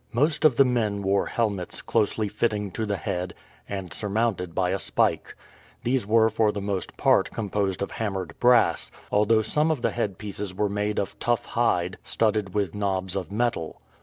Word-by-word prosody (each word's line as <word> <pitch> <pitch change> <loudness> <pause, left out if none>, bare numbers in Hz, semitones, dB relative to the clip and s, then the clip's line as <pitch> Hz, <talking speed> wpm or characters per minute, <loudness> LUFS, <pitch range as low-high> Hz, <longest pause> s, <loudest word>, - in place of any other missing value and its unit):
Most 150 +6 +2
of 145 -6 +6
the 135 - +6
men 110 -5 0
wore 100 +1 +2
helmets 100 -6 -2
closely 110 -1 +1
fitting 105 -1 -1
to 110 +3 -3
the 100 -1 -1
head 90 0 -3 0.3
and 95 -4 -5
surmounted 100 -4 -1
by 90 -1 +1
a 95 - -1
spike. - - 0 0.5
These 125 -3 0
were 110 +1 +4
for 110 -2 +2
the 105 - -4
most 100 -2 -3
part - - +3
composed 100 -3 -1
of - - -5
hammered 95 -6 -3
brass, 125 -1 +4 0.2
although 110 +2 +3
some 150 +8 +1
of 150 -6 -1
the - - +2
headpieces 100 -3 -4
were 105 +1 +1
made 105 +1 -1
of 100 - -3
tough 120 -1 0
hide 90 -7 0
studded 105 -4 0
with 100 -5 0
knobs 95 -2 -1
of 95 0 -4
metal. 110 -7 -1
105 Hz, 175 wpm, -26 LUFS, 95-115 Hz, 0.5 s, of